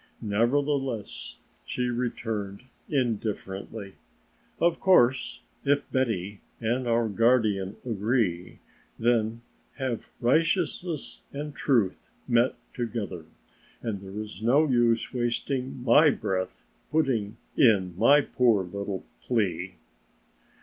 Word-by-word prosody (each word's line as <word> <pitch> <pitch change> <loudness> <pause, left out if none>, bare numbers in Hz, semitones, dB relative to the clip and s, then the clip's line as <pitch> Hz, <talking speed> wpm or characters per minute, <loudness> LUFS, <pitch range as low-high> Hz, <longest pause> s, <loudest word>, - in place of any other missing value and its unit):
Nevertheless 125 +2 -1 0.3
she 125 -1 -2
returned 115 -4 -3 0.3
indifferently: 105 -5 -2 0.7
"Of 170 0 +2
course 130 -9 +3 0.2
if 145 0 +2
Betty 105 -6 -1 0.2
and 120 +2 -1
our 115 0 +2
guardian 110 -3 +2
agree, 105 -6 0 0.4
then 115 -1 +1 0.3
have 130 -4 -3
righteousness 165 +4 0
and 145 +1 -5
truth 115 -10 +1 0.2
met 120 +2 +3 0.2
together 110 -9 -4 0.6
and 105 -4 -3
there 100 +1 -7
is 105 -2 -7
no 140 +7 +4
use 120 -3 +2
wasting 125 +1 -2
my 145 +6 +6
breath 95 -8 -2
by - - -39
putting 115 -6 -2 0.2
in 100 -8 +4
my 140 +9 +6
poor 120 -7 +2
little 100 +1 -5 0.2
plea." 95 - -1
115 Hz, 100 wpm, -27 LUFS, 100-130 Hz, 0.7 s, my